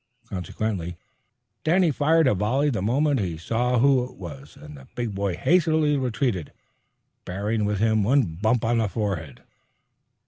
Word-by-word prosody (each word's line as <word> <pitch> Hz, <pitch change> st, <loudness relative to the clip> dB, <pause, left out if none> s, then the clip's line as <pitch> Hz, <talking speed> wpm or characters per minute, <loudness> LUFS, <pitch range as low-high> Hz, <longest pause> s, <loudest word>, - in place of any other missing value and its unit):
Consequently 90 Hz, -2 st, -4 dB, 0.7 s
Danny 170 Hz, +1 st, +3 dB
fired 160 Hz, +3 st, +3 dB
a 130 Hz, -, +4 dB
volley 125 Hz, +9 st, +1 dB
the 110 Hz, -7 st, -2 dB
moment 135 Hz, +6 st, +1 dB
he 90 Hz, -5 st, -2 dB
saw 120 Hz, +9 st, 0 dB
who 130 Hz, +1 st, +4 dB
it 125 Hz, -, -13 dB
was, 75 Hz, -4 st, -10 dB
and 75 Hz, 0 st, -11 dB
the 65 Hz, -2 st, -14 dB
big 120 Hz, -4 st, -3 dB
boy 95 Hz, -2 st, -1 dB
hastily 155 Hz, -, +2 dB
retreated, 125 Hz, -, -1 dB, 0.7 s
bearing 105 Hz, +4 st, -2 dB
with 105 Hz, 0 st, 0 dB
him 110 Hz, +1 st, +2 dB
one 130 Hz, +7 st, +3 dB
bump 110 Hz, +7 st, 0 dB
on 115 Hz, +1 st, +2 dB
the 110 Hz, -2 st, 0 dB
forehead. 95 Hz, -, -4 dB
110 Hz, 150 wpm, -24 LUFS, 95-135 Hz, 0.7 s, a